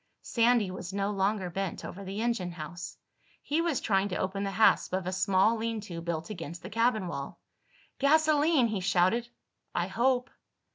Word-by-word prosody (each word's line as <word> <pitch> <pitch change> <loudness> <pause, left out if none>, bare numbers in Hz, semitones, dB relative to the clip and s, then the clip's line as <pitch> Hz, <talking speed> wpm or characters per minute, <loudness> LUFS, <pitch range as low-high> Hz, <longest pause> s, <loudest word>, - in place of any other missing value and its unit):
Sandy 230 -4 +2
was 185 0 -6
no 200 +1 -1
longer 195 -2 0
bent 195 0 -3
over 200 - -7
the 195 +3 -4
engine 200 -7 -1
house. 170 +2 -7 0.5
He 305 +3 0
was 335 -7 0
trying 195 -1 +1
to 180 - -3
open 190 +1 -2
the 200 - -1
hasp 220 - +4
of 185 -1 -1
a 185 - -2
small 190 +3 +3
lean 225 0 -2
to 175 -5 -7
built 165 +2 -3
against 170 -3 -7
the - - -8
cabin 225 -2 +2
wall. 140 -5 -6 0.6
"Gasoline!" 305 -1 +4
he 210 -3 -1
shouted. 185 +6 +2 0.5
"I - - +1
hope." 250 0 +1
200 Hz, 175 wpm, -29 LUFS, 185-235 Hz, 0.6 s, hasp